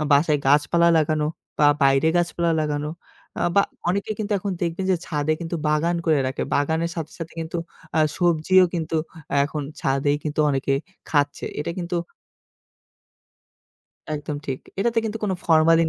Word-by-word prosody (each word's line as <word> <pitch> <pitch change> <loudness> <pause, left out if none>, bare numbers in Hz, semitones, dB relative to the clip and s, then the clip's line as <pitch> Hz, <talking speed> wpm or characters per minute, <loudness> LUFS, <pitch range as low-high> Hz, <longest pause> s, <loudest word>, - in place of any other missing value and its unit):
আ - - 0
বাসায় 150 +1 +4
গাছপালা 150 +4 +4
লাগানো 155 0 +1 0.3
বা 150 - +6 0.2
বাইরে 135 +3 +4
গাছপালা 170 -1 +1
লাগানো 150 0 -1 0.5
আ - - -2
বা 200 - +6 0.3
অনেকে 200 +4 -1
কিন্তু 210 0 -2
এখন 195 0 -3
দেখবেন 170 +2 -1
যে - - +3
ছাদে 150 0 0
কিন্তু 170 0 -3
বাগান 165 +3 +2
করে 155 -3 +4
রাখে। 130 - -2
বাগানের 160 +4 +1
সাথে, 160 -1 -4
সাথে 165 0 -6
কিন্তু 165 +1 -4 0.4
আ - - +4 0.2
সবজিও 175 +2 +4
কিন্তু 165 -1 -1 0.5
এখন 150 0 -3 0.2
ছাদেই 140 +2 +1
কিন্তু 155 0 -1
অনেকে 135 0 0 0.4
খাচ্ছে 145 -1 +1
এটা 160 - -2
কিন্তু 175 0 -2 2.2
একদম 150 0 -4
ঠিক। 130 -1 -2 0.2
এটাতে 230 +3 +2
কিন্তু 220 0 -3
কোন 195 - 0
ফরমালিন 165 0 +5
160 Hz, 150 wpm, -23 LUFS, 150-175 Hz, 2.2 s, বা